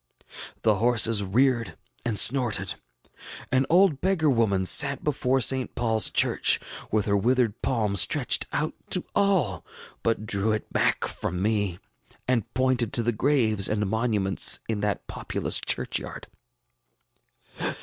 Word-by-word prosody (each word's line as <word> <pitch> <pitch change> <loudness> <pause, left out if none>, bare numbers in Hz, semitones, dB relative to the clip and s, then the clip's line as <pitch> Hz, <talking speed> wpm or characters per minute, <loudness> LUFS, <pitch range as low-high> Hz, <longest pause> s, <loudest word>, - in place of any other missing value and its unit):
The 110 -2 +2
horses 115 -1 +1
reared 120 +4 0 0.3
and 115 -3 -2
snorted. 120 +3 +3 0.8
An 130 0 +1
old 175 -4 +3
beggar 175 -6 +1
woman 100 -6 0
sat 140 +6 +4
before 135 -3 0
St. 130 +3 +2
PaulŌĆÖs 110 -3 +1
Church, - - +2 0.3
with 105 -2 0
her 100 - 0
withered 120 +1 0
palm 110 -5 -1
stretched 125 - 0
out 155 +1 -2 0.2
to 180 - 0
all, 180 - +1 0.4
but 115 -2 -2
drew 105 +1 +1
it 110 - -6
back - - 0
from 90 - -5
me, 100 -3 -1 0.5
and 125 -4 -1
pointed 130 -3 0
to 120 - +2
the 120 - 0
graves 110 -5 +1
and 105 -1 -1
monuments 105 -3 +1
in 110 -2 -3
that 105 0 -3
populous - - 0
churchyard. - - -3
115 Hz, 130 wpm, -25 LUFS, 105-130 Hz, 0.8 s, sat